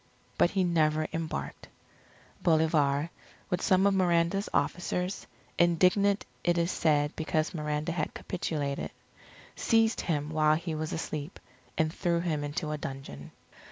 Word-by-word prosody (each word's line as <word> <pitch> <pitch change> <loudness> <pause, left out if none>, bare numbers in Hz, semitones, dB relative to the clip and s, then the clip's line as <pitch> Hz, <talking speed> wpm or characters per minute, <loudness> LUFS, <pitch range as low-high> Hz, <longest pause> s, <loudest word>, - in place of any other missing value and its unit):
But - - +4
he 190 0 +1
never 155 -3 +2
embarked. 155 - -4 0.7
Bolivar, 155 -2 +2 0.4
with 180 - 0
some 190 +1 +3
of 200 - +4
Miranda's 180 +1 +2
officers, 180 +1 -1 0.3
indignant 185 +4 +3 0.2
it 175 0 +2
is 170 +1 +1
said 150 -2 +1
because 155 0 -1
Miranda 150 0 -2
had 165 -2 -2
capitulated, 145 -6 -3 0.7
seized 225 0 +2
him 150 -3 -1
while 155 -1 +4
he 165 +1 -3
was 155 0 -3
asleep, 155 0 -4 0.4
and 155 0 +1
threw 170 -2 0
him 160 -4 -1
into 145 +1 -3
a 150 - -3
dungeon. 135 - -7
160 Hz, 130 wpm, -29 LUFS, 150-175 Hz, 0.7 s, But